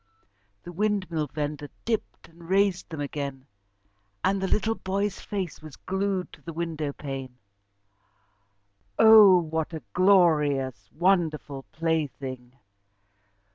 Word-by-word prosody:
The 175 - -8
windmill 185 -5 -1
vendor 145 0 -4 0.2
dipped 225 -2 -3
and 165 +1 -16
raised 195 -1 +2
them 160 -3 -6
again, 140 -2 -5 0.8
and 195 +1 +1
the 190 - 0
little 220 +3 +1
boy's 200 -1 -2
face 190 -7 -5
was 155 -3 -11
glued 190 -1 -2
to - - -14
the 165 - -8
window 160 -3 -3
pane. 135 -3 -7 1.6
Oh! 220 -4 +8
What 160 -1 -2
a 155 - -7
glorious, 150 - +3
wonderful 155 -6 0
plaything! 140 -6 -3
165 Hz, 110 wpm, -26 LUFS, 145-190 Hz, 1.6 s, Oh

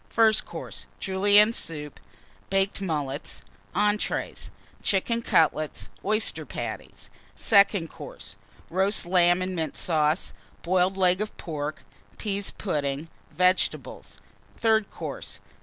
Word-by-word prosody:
FIRST 220 -2 +3
COURSE. - - -8
Julienne 205 +3 +4
Soup. 150 -8 -5 0.5
Baked 195 +1 +1
Mullets. 150 -6 -3 0.3
ENTREES. 210 0 0 0.3
Chicken 230 +4 +1
Cutlets. 155 -7 +1
Oyster 215 +2 +1
Patties. - - -7 0.2
SECOND 200 -4 +4
COURSE. - - -9 0.4
Roast 190 +3 +2
Lamb 175 0 +4
and 185 0 -3
Mint 160 -2 -2
Sauce. 155 0 +1 0.3
Boiled 185 +2 +2
Leg 185 0 +3
of 215 - -4
Pork. 150 -2 -5 0.3
Pease 200 -2 -2
Pudding. 145 -4 -2 0.2
Vegetables. 180 +1 0 0.4
THIRD 220 -2 +2
COURSE. - - -7
185 Hz, 105 wpm, -26 LUFS, 160-205 Hz, 0.5 s, Julienne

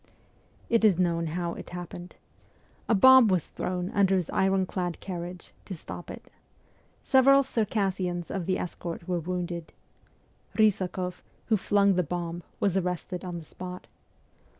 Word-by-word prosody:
It 230 -1 +2
is 205 -6 +5
known 170 -2 +1
how 170 -1 -2
it - - -9
happened. 175 0 -8 0.7
A 225 - +5
bomb 260 +3 +8
was 185 -5 +1
thrown 180 0 -3
under 195 -1 +3
his 180 -3 -1
iron 190 0 +2
clad 180 -2 -3
carriage, 180 -1 -7
to 190 - -6
stop 175 +1 -9
it. - - -10 0.7
Several 275 +1 +6
Cir 235 -4 0
cassians 185 -4 -2
of 185 -4 -3
the 185 -1 +1
escort 170 -1 -6
were 180 -1 0
wounded. 175 -1 -4 0.8
Bysakoff, 185 -4 +1 0.3
who 220 - +5
flung 200 0 +3
the - - +4
bomb, 175 +1 -4 0.2
was 195 -3 +1
arrested 180 0 -2
on 180 -2 -5
the 165 - -9
spot. 180 +3 -8
180 Hz, 150 wpm, -28 LUFS, 175-195 Hz, 0.8 s, bomb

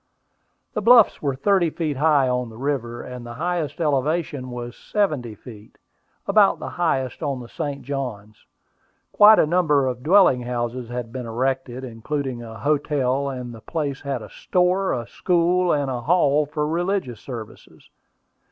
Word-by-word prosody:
The 215 - -2
bluffs 230 0 +6
were 140 -3 -1
thirty 175 +4 +2
feet 155 -3 -3
high 145 -2 +3
on 125 -1 -1
the 110 - -12
river, 120 -3 -3
and 125 -1 -8
the 120 0 -8
highest 170 +1 -2
elevation 150 -2 -1
was 120 -1 -6
seventy 150 - -1
feet, 105 -1 -14 0.5
about 200 0 +4
the - - -6
highest 135 -7 -1
on 140 -4 -2
the 120 - -9
St. 140 +3 -5
Johns. 120 -7 -6 0.6
Quite 215 +1 +8
a - - +5
number 150 -4 +2
of 125 -1 -3
dwelling 170 -5 +5
houses 120 0 -3
had 120 -1 -5
been 125 -2 -5
erected, 130 +2 -2
including 130 +1 -4
a 110 -1 -9
hotel, 140 -2 0
and 125 -2 -6
the 115 - -11
place 145 -1 -3
had 135 -5 -3
a 105 - -10
store, 180 +2 +1
a 120 -1 -2
school, 180 +5 +1
and 140 -3 0
a 125 -2 -3
hall 150 -1 +2
for 150 0 -2
religious 175 - -1
services. 115 -5 -10
135 Hz, 160 wpm, -23 LUFS, 125-160 Hz, 0.6 s, Quite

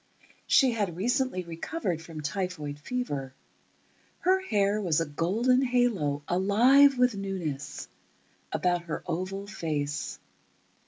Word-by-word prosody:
She 265 -3 +5
had 205 -7 -2
recently 245 -1 0
recovered 170 - -3
from 160 -1 -8
typhoid 150 -3 -3
fever. 145 - -4 0.9
Her 375 +1 +3
hair 210 - +1
was 170 -6 +1
a 165 - 0
golden 210 - +1
halo, 230 - +1
alive 245 +10 +5
with 250 -1 +4
newness, 185 -8 -4 0.6
about 175 -1 0
her 160 - -4
oval 185 +3 -3
face. 150 -7 -3
190 Hz, 110 wpm, -28 LUFS, 160-245 Hz, 0.9 s, She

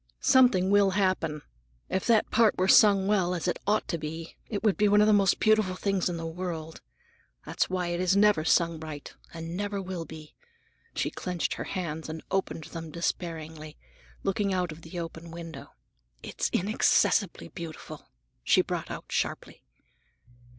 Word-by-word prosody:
Something 210 -8 +4
will 200 -1 +5
happen. 165 -6 0 0.4
If 190 - -2
that 225 -3 +3
part 220 -1 +4
were 185 - +2
sung 200 -1 +6
well, 200 -2 +2
as - - -2
well 180 - -1
as 175 - -3
it 175 - -1
ought 210 +1 +1
to 170 - -2
be, 160 +2 -6
it 205 -1 -3
would 215 -3 +3
be 210 - +3
one 205 +1 +5
of 210 - +6
the 215 - +5
most 195 -3 +3
beautiful 215 -4 +3
things 195 -1 0
in 175 - -3
the 165 - -5
world. 165 -1 -5 0.6
That's - - -1
why 180 -2 -1
it 180 +2 +1
never 205 -4 +4
is 160 - -1
sung 170 -1 +2
right, 155 -2 -8 0.2
and 165 +1 -6
never 205 +1 -2
will 185 -3 -5
be." 155 -1 -11 0.6
She - - -1
clenched 180 -2 -2
her - - -5
hands 160 -4 -4
and 160 0 -6
opened 190 -4 -1
them 165 0 -8
despairingly, 160 -2 -4 0.5
looking 195 +1 0
out 180 -2 -1
of 155 +2 -10
the 165 +2 -9
open 165 0 -7
window. 165 -3 -9 0.5
"It's - - -2
inaccessibly 200 -1 +2
beautiful!" 165 -3 -9 0.3
she - - +4
brought - - -4
out - - -6
sharply. - - -3
180 Hz, 175 wpm, -28 LUFS, 165-200 Hz, 0.6 s, sung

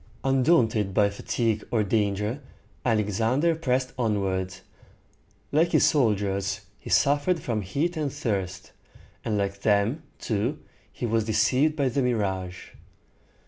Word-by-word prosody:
Undaunted 125 - +2
by 100 -1 +4
fatigue 110 +1 -1
or 110 -3 +1
danger, 105 +4 0 0.4
Alexander 115 - +1
pressed 130 -5 -1
onward. 95 -5 0 1.0
Like 165 +4 +2
his - - +5
soldiers, 100 - +1 0.2
he - - -10
suffered 145 +5 +3
from 115 -7 -2
heat 145 - -1
and 150 -3 -1
thirst; 95 -10 -3 0.5
and 105 -2 -1
like 100 0 -2
them, 105 +8 +2 0.2
too, 115 +6 -1 0.3
he 125 - -5
was 115 -1 +1
deceived 135 +7 +2
by 140 -3 +1
the 130 +2 0
mirage. 95 -7 -2
110 Hz, 120 wpm, -26 LUFS, 100-135 Hz, 1.0 s, his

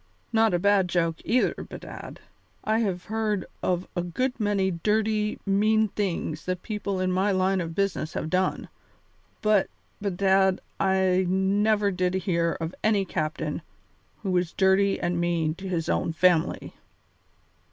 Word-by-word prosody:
Not 225 0 +4
a - - +3
bad 200 0 +3
joke, 165 -2 +1
either, 245 +4 +2
bedad. - - -9 0.4
I 220 +1 +1
have 190 -5 -1
heard 215 -3 -1 0.2
of 180 0 -1
a 175 - 0
good 250 +10 -2
many 200 -3 +1
dirty, 210 +4 0
mean 215 +2 +3
things 175 -6 -3
that 185 -1 -3
people 210 -3 -3
in 185 0 0
my 190 +3 +2
line 190 0 +1
of 165 -1 -5
business 195 -5 -1
have - - -3
done, 185 0 0 0.8
but, 215 -2 +3 0.3
bedad, 190 -1 +2 0.2
I 190 -1 +2
never 200 +2 +2
did 180 0 0
hear 170 -3 0
of 165 +1 -4
any 210 -3 +2
captain 155 -3 -3 0.6
who 195 - -1
was 180 -2 0
dirty 195 +1 +3
and 175 0 -1
mean 170 -2 0
to 190 +3 -7
his 165 -3 -1
own 165 - 0
family. 170 0 +2
190 Hz, 145 wpm, -26 LUFS, 175-205 Hz, 0.8 s, Not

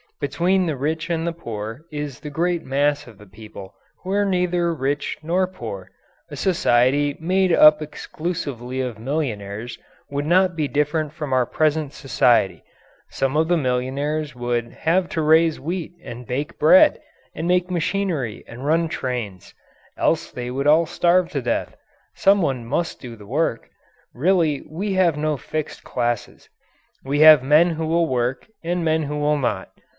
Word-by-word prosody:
Between 175 +6 +1
the 155 - -1
rich 155 +5 -2
and 165 -1 -1
the 170 - 0
poor 115 -2 -7
is 145 -2 -5
the 150 - -7
great 170 +3 -1
mass 145 +2 0
of 115 -4 -14
the 105 - -13
people 105 -1 -12 0.3
who 185 - -5
are 205 +1 +2
neither 180 -2 +1
rich 145 -1 -2
nor 180 +4 +1
poor. 100 - -8 0.4
A - - -8
society 145 -4 +2
made 185 +3 +1
up 155 -2 +7
exclusively 145 -5 -5
of 120 -4 -4
millionaires 115 -5 -4 0.3
would 145 +1 -2
not 180 +1 +3
be 155 -3 -1
different 150 +1 -1
from 150 -4 -5
our 125 -1 +2
present 155 -2 0
society; 115 - +1 0.5
some 135 +1 -1
of 160 +1 +2
the 175 0 +2
millionaires 140 +2 -2
would 120 -1 -2
have 175 +3 0
to 160 - -2
raise 160 +1 +4
wheat 170 +4 -4
and 120 0 -9
bake 140 +4 -4
bread 285 - +6 0.4
and 165 - -3
make 180 0 +1
machinery 170 - -2
and 125 +4 -9
run 165 +2 +2
trains 120 - -5 0.4
else - - 0
they 125 0 -5
would 135 +3 -2
all 160 +3 +5
starve 175 +2 +2
to 140 - -3
death. 120 - -2 0.4
Someone 155 -12 +2
must 155 +8 -2
do 120 -3 -8
the 105 -2 -14
work. 140 -2 -1 0.4
Really 160 0 +1
we 195 +6 -3
have 180 -5 +2
no 155 0 0
fixed 155 +4 -5
classes. 120 -2 -3 0.5
We 140 +2 -1
have 155 -4 +9
men 155 +6 +4
who 160 0 -3
will 165 +1 +2
work 125 -1 -2 0.2
and 175 0 -1
men 160 0 +1
who 150 0 -4
will 150 0 +1
not. 105 -8 -2
150 Hz, 160 wpm, -22 LUFS, 125-170 Hz, 0.5 s, have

